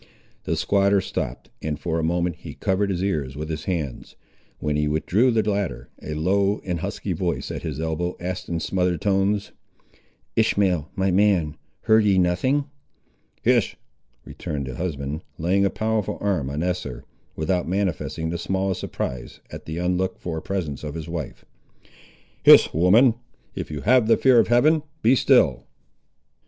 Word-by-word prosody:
The - - 0
squatter 100 0 +2
stopped, - - -5
and 75 -1 -3
for 85 -2 -1
a - - -2
moment 85 +1 0
he - - -10
covered 100 +1 0
his 95 -1 -1
ears 75 -9 -2
with 75 +2 -5
his 80 0 -5
hands. 80 -9 -4 0.4
When 75 -1 -2
he 75 0 +1
withdrew 90 +11 +2
the 110 -3 +1
latter, 100 - -2
a 75 - -5
low 100 +6 +1
and 90 -3 -2
husky - - -3
voice - - -2
at - - -5
his - - -5
elbow 80 +2 -2
asked 90 +1 -5
in 85 -1 -1
smothered 90 -1 0
tones— 100 +1 +1 0.8
"Ishmael, 95 -8 +2
my 95 0 +1
man, 90 -6 +2 0.3
heard 110 0 +4
ye 100 -2 +3
nothing?" 95 +11 +2 0.8
"Hist," - - +2 0.5
returned 70 -3 -5
the 65 - -6
husband, 75 -1 -4 0.2
laying 95 +5 +2
a - - +3
powerful 110 0 -1
arm 95 -10 -1
on 75 +3 -2
Esther, 90 -8 -3 0.3
without 90 +3 -1
manifesting 85 -3 -2
the 85 - -3
smallest 95 0 -1
surprise 65 -1 -5
at - - -9
the 80 +1 -4
unlooked 90 +1 -1
for 80 -2 -4
presence 85 -8 -4
of 75 0 -5
his 80 -1 -6
wife. 85 -5 -6 1.0
"Hist, - - +7
woman! 105 - +5 0.4
if - - -5
you 75 -2 -5
have 125 - +4
the 115 - +5
fear 130 -3 +5
of 110 - +3
Heaven, 150 +7 +4 0.2
be 125 +4 +5
still!" - - +3
90 Hz, 160 wpm, -23 LUFS, 80-100 Hz, 1.0 s, Hist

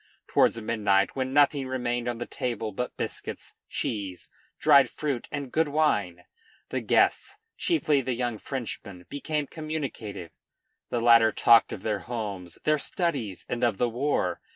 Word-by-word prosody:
Towards 115 - +3
midnight, 105 -3 +1
when 130 -1 -2
nothing 140 -1 +3
remained 120 -2 -2
on 120 -1 -2
the 120 - -4
table 115 -3 -3
but 125 +5 -4
biscuits, - - -5 0.2
cheese, 100 -5 -4 0.3
dried 140 -3 +6
fruit, 140 -6 -3
and 140 -4 -4
good 160 0 +2
wine, 105 - +1 0.5
the - - -2
guests, - - +2 0.2
chiefly 155 - +2
the 130 -1 -2
young 120 -3 -2
Frenchmen, 105 -9 -6
became 150 +1 -2
communicative. 140 - -5 0.6
The 120 - -1
latter 115 -1 +6
talked 115 +1 +5
of - - -6
their 105 -2 -1
homes, 100 -6 -5
their 155 -1 +2
studies, 140 - -2
and 125 0 -3
of 115 -5 +2
the 120 - +1
war. 135 +6 -1
120 Hz, 150 wpm, -27 LUFS, 110-145 Hz, 0.6 s, dried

